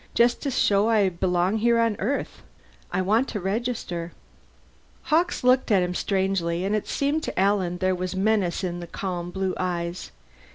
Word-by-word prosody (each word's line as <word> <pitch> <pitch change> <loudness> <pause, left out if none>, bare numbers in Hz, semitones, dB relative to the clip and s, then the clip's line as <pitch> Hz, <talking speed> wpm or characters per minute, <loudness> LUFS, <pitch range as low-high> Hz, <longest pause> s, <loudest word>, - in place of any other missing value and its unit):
Just 240 +1 +3
to 285 - -1
show 205 -4 +2
I 210 -4 +3
belong 180 +3 0
here 235 +2 +3
on 230 -2 +2
Earth. 255 +9 -2 0.5
I 185 - 0
want 220 +7 +2
to 210 - -4
register." 190 -4 -3 0.9
Hawkes 325 -2 +1
looked 255 +1 +3
at 195 -4 +4
him 180 0 -2
strangely, 190 -2 0
and 205 +2 +1
it 215 - -2
seemed 285 +3 0
to - - -4
Alan 190 -3 +1
there 185 0 +1
was 185 0 -3
menace 195 -2 +1
in 175 -1 -3
the 175 - -7
calm 175 -1 -4
blue 190 0 -2
eyes. 175 -1 -3
195 Hz, 170 wpm, -25 LUFS, 180-225 Hz, 0.9 s, at